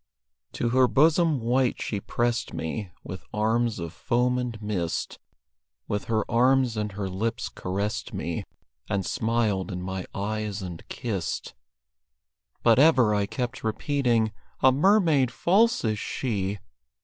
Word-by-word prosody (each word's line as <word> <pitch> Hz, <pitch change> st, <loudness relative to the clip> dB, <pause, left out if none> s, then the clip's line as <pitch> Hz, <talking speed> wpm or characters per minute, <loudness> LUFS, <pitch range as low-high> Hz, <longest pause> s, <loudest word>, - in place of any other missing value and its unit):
To 120 Hz, -, -1 dB
her 130 Hz, +1 st, +4 dB
bosom 155 Hz, +2 st, +3 dB
white 125 Hz, +2 st, +1 dB
she 105 Hz, -, -2 dB
pressed 120 Hz, +3 st, -1 dB
me 90 Hz, +5 st, -4 dB
With 95 Hz, -, -7 dB
arms 115 Hz, +2 st, +1 dB
of 85 Hz, -2 st, -5 dB
foam 125 Hz, 0 st, +1 dB
and 120 Hz, -3 st, -4 dB
mist; 100 Hz, -6 st, -3 dB, 0.7 s
With 105 Hz, 0 st, -2 dB
her 110 Hz, -1 st, 0 dB
arms 125 Hz, 0 st, +3 dB
and 105 Hz, -2 st, -2 dB
her 100 Hz, 0 st, -3 dB
lips 100 Hz, +5 st, -2 dB
caressed 100 Hz, +3 st, -3 dB
me, -, -, -3 dB, 0.5 s
And 100 Hz, -3 st, 0 dB
smiled 110 Hz, -4 st, 0 dB
in 90 Hz, 0 st, -4 dB
my 95 Hz, 0 st, -4 dB
eyes 105 Hz, 0 st, -3 dB
and 90 Hz, -3 st, -6 dB
kissed. 100 Hz, -8 st, -3 dB, 1.1 s
But 115 Hz, 0 st, +5 dB
ever 130 Hz, -8 st, +5 dB
I 100 Hz, -1 st, +1 dB
kept 120 Hz, +3 st, -4 dB
repeating, 115 Hz, -1 st, +1 dB, 0.3 s
"A 130 Hz, -, +7 dB
mermaid 155 Hz, -, +4 dB
false 215 Hz, -, +2 dB
is 110 Hz, -1 st, 0 dB
she!" 100 Hz, -5 st, -2 dB
115 Hz, 135 wpm, -26 LUFS, 100-125 Hz, 1.1 s, A